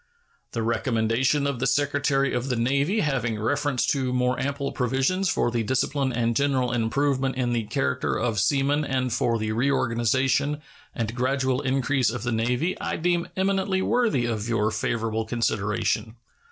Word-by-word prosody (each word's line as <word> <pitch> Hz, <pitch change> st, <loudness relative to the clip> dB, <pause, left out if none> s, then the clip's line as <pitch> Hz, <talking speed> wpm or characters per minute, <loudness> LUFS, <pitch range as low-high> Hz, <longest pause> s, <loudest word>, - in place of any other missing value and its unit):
The 115 Hz, -, -1 dB
recommendation 115 Hz, +4 st, +1 dB
of 140 Hz, -4 st, -1 dB
the 135 Hz, -, +1 dB
Secretary 140 Hz, 0 st, +1 dB
of 125 Hz, +2 st, -2 dB
the 125 Hz, -, +1 dB
Navy 140 Hz, -, +1 dB
having 125 Hz, -, -1 dB
reference 135 Hz, +2 st, 0 dB
to 130 Hz, -3 st, -1 dB
more 125 Hz, 0 st, +1 dB
ample 140 Hz, +1 st, -2 dB
provisions 135 Hz, +10 st, 0 dB
for 120 Hz, -, +1 dB
the 120 Hz, -1 st, 0 dB
discipline 130 Hz, +3 st, 0 dB
and 115 Hz, -1 st, 0 dB
general 135 Hz, -3 st, +1 dB
improvement 130 Hz, +3 st, 0 dB
in 125 Hz, -2 st, 0 dB
the 115 Hz, -2 st, -1 dB
character 65 Hz, -9 st, -1 dB
of 115 Hz, -3 st, 0 dB
seamen 140 Hz, +6 st, +2 dB
and 130 Hz, -3 st, -1 dB
for 115 Hz, 0 st, +1 dB
the 110 Hz, -1 st, -2 dB
reorganization 130 Hz, +3 st, +1 dB, 0.4 s
and 115 Hz, -1 st, -2 dB
gradual 130 Hz, +1 st, 0 dB
increase 135 Hz, -1 st, +1 dB
of 115 Hz, -1 st, -4 dB
the 120 Hz, -, -1 dB
Navy 125 Hz, +10 st, 0 dB
I -, -, -2 dB
deem 175 Hz, +1 st, 0 dB
eminently 190 Hz, 0 st, +1 dB
worthy 230 Hz, -, +1 dB
of 110 Hz, -1 st, -2 dB
your 110 Hz, -2 st, +1 dB
favorable 110 Hz, +1 st, -1 dB
consideration. 110 Hz, -1 st, -1 dB
130 Hz, 155 wpm, -25 LUFS, 115-140 Hz, 0.4 s, seamen